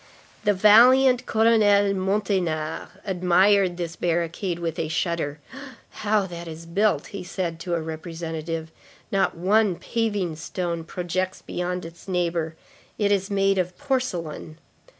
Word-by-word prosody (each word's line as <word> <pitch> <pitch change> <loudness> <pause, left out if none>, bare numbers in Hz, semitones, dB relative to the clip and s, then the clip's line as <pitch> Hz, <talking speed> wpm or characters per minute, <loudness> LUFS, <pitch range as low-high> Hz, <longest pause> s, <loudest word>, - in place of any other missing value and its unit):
The 205 - +4
valiant 250 +5 +6
Colonel 225 +1 +4 0.3
Monteynard 185 -5 -1 0.2
admired 185 0 +3
this 170 -1 -4
barricade 170 +2 -1
with 165 -2 -3
a 160 - -1
shudder.—"How 200 - -3
that 170 -2 -8
is 165 +1 -8
built!" 170 -2 +1
he 195 -2 -5
said 175 -2 -4
to 175 0 -2
a 165 - -1
Representative. 160 0 -5 0.4
"Not 195 -3 +1
one 200 +2 +3
paving 205 -7 -2
stone 170 0 -4
projects 185 +2 -3
beyond 180 0 -3
its 165 +2 -12
neighbor. 170 -3 -1 0.4
It 205 -1 +1
is 195 -1 +1
made 195 -1 +2
of 180 0 -2
porcelain." 185 - -3
180 Hz, 125 wpm, -24 LUFS, 165-205 Hz, 0.4 s, valiant